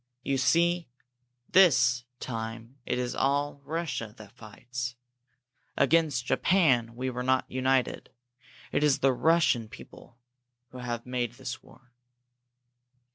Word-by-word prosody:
You 135 -1 0
see, 170 +5 +2 0.6
this 130 -9 +5
time 115 +2 -6
it - - 0
is 125 0 -2
all 140 +1 0
Russia 145 -8 -4
that 105 -2 -13
fights. 120 +3 -7 0.8
Against 155 -7 +2
Japan 130 -11 +2
we 130 +1 -3
were 125 0 -4
not 130 +1 +1
united. 130 0 0 0.6
It 145 - +1
is 145 -3 +4
the 135 -1 +4
Russian 155 -6 +2
people 120 +2 -14 0.5
who 130 - -10
have 120 -1 -4
made 125 -2 -2
this 130 0 -7
war." 120 0 -21
130 Hz, 120 wpm, -28 LUFS, 120-140 Hz, 0.8 s, this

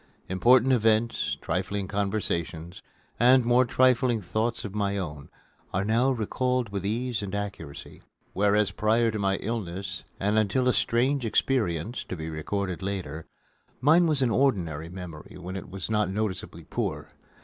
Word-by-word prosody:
Important 120 +7 +5
events, 115 0 +2
trifling 95 +2 -2
conversations, 95 -5 -2 0.4
and 125 +1 +6
more 125 +2 +4
trifling 125 -1 +3
thoughts 110 +5 -2
of 100 - -6
my 100 -1 0
own 75 -6 -5 0.5
are 95 +2 +1
now 115 +5 +3
recalled 125 0 0
with 100 -2 -4
ease 115 +2 -1
and 100 -1 -4
accuracy; 95 -8 -6 0.3
whereas, 105 +1 +2
prior 115 +2 +2
to 110 - -3
my 95 -1 +1
illness 95 -4 -4 0.2
and 105 +2 +2
until 110 +5 +1
a 125 - +4
strange 125 +5 +1
experience 110 -4 0
to - - -5
be 80 -1 -5
recorded 90 +4 -3
later, 90 -6 -4 0.5
mine 160 +7 +5
was 150 -4 +2
an 120 - +2
ordinary 85 - +1
memory 90 -3 -9
when 90 +1 -7
it 95 - -6
was 95 0 -5
not 105 -3 +1
noticeably 105 -1 -3
poor. - - -3
105 Hz, 150 wpm, -27 LUFS, 95-120 Hz, 0.5 s, and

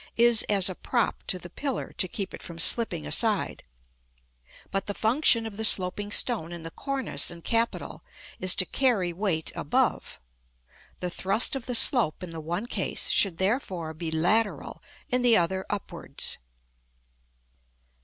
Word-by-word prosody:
is 235 -1 +6
as 195 -3 +2
a 185 - -1
prop 235 +5 -1
to 185 - -1
the 175 - -9
pillar 270 - -4
to 185 - 0
keep 195 +1 -5
it - - -9
from 170 - -8
slipping 180 - +2
aside; 75 - 0 1.1
but 195 0 -1
the 205 - -3
function 230 0 +3
of 215 -3 -7
the 220 - -3
sloping 205 0 +2
stone 205 -8 +2
in 170 -1 -7
the 165 - -6
cornice 270 - 0
and 170 -1 -9
capital 230 0 -1 0.4
is 185 -1 +3
to 185 - +3
carry 205 -8 +1
weight 175 -4 -1
above. - - -1 0.8
The 180 -1 -3
thrust 195 +9 +1
of 265 -3 -6
the 250 - -1
slope 230 - +3
in 180 - -7
the 165 -1 -7
one 175 +7 -3
case - - -2
should 190 -5 +2
therefore 190 -5 -2
be 160 +1 -5
lateral, 190 +8 0 0.3
in 250 0 +1
the 240 -2 +5
other 190 +2 -1
upwards. 205 -1 -3
195 Hz, 155 wpm, -26 LUFS, 175-230 Hz, 1.1 s, is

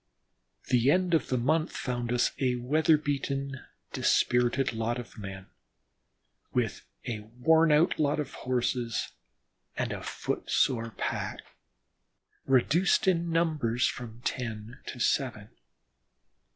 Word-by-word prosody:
The 125 0 +4
end 180 +3 +2
of 165 - +2
the 130 - +1
month 155 +7 +1
found 120 -2 -2
us 125 0 +2
a 125 -2 +2
weather 155 +6 +3
beaten, 140 -2 -2 0.3
dispirited 125 +2 +2
lot 115 +2 -1
of 120 -2 -9
men, 95 -2 -7 1.1
with - - -1 0.2
a 115 -4 -3
worn 140 +10 +3
out 155 +4 +3
lot 145 0 +2
of 145 -2 -4
Horses, 125 -2 -1 0.7
and - - -1
a - - -6
foot - - -4
sore 115 -3 +2
pack, - - -3 1.1
reduced 150 +10 +3
in 170 -2 +2
numbers 155 -8 +1
from 120 -1 -6
ten 115 -1 -4
to 125 - -6
seven. 120 -5 0
125 Hz, 120 wpm, -29 LUFS, 120-150 Hz, 1.1 s, The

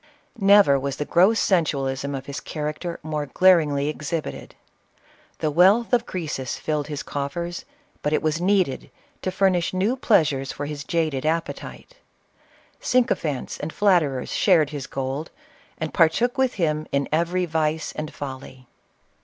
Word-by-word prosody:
Never 195 -8 +6
was 140 0 -3
the 145 - -3
gross 190 +9 +4
sensualism 140 -6 0
of 135 -1 -6
his 140 0 -5
character 155 +3 -5
more 150 -1 -3
glaringly 150 -4 +3
ex 150 -1 -4
hibited. 165 -2 -4 0.8
The 155 - -1
wealth 195 - +4
of 240 -1 +2
Crcesus 150 -7 -4
filled 150 -2 -2
his 150 -2 -5
coffers, 170 +5 -4 0.4
but 150 - -1
it 155 - +1
was 155 +1 0
needed 185 -7 +1 0.3
to - - -1
furnish 185 -2 +1
new 200 +7 +1
pleasures 155 - +2
for 145 - -5
his 145 -1 -5
jaded 155 -3 -1
appetite. 165 - -4 0.8
Sycophants 165 - 0
and 150 - -4
flatterers 165 -11 +1
shared 160 -7 +3
his 145 -3 -5
gold, 135 +4 -4 0.5
and 160 -2 -4
partook 185 +10 +3
with 265 -2 +1
him 155 -4 -1
in 140 0 0
every 170 +3 +1
vice 160 -1 -1
and 155 0 -5
folly. 130 -2 -8
155 Hz, 145 wpm, -23 LUFS, 145-180 Hz, 0.8 s, Never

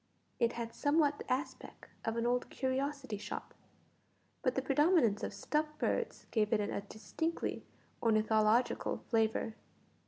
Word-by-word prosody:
It 235 -1 +3
had 230 -1 -4
somewhat 290 -1 +2
the - - -6
aspect 265 +5 -4
of 225 +1 -1
an 230 - 0
old 245 +1 +1
curiosity 265 -2 -2
shop, - - -6 0.9
but 255 -3 +1
the 265 - +1
predominance 275 - +4
of - - -2
stuffed 305 0 -1
birds - - -1
gave 210 -2 +2
it 225 - +3
a 205 -1 -1
distinctly 220 +11 -3 0.3
ornithological 220 +1 +2
flavour. 225 -1 +2
245 Hz, 130 wpm, -34 LUFS, 220-285 Hz, 0.9 s, predominance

